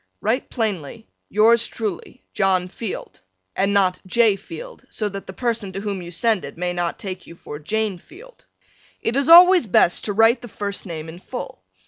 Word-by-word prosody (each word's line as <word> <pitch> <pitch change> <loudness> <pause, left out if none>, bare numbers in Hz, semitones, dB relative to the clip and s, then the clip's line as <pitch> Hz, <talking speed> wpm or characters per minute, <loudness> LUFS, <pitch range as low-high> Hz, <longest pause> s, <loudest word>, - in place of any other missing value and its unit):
Write 235 +5 -1
plainly 220 - -3 0.2
Yours 225 +2 +4
truly, 220 +3 -6
John 190 -3 +1
Field 210 +1 -7 0.3
and 195 +1 +1
not 190 -2 +2
J. 220 +1 +4
Field, 480 - -10
so 215 - -3
that 195 -1 -7
the - - -6
person 230 -2 -2
to 195 - -4
whom 200 -2 -3
you 175 - -8
send 210 +4 0
it - - -9
may 180 0 -2
not 175 -1 -2
take 185 -2 -7
you 170 - -11
for 150 -3 -9
Jane 205 +4 -2
Field. 475 - -16 0.5
It 230 - -2
is 280 +3 +1
always 355 -4 +8
best 175 -2 +3
to 205 - -1
write 225 +4 +4
the 240 - -8
first 200 -2 -5
name 160 -2 -6
in 165 +2 -10
full. 245 - -7
205 Hz, 185 wpm, -22 LUFS, 185-235 Hz, 0.5 s, always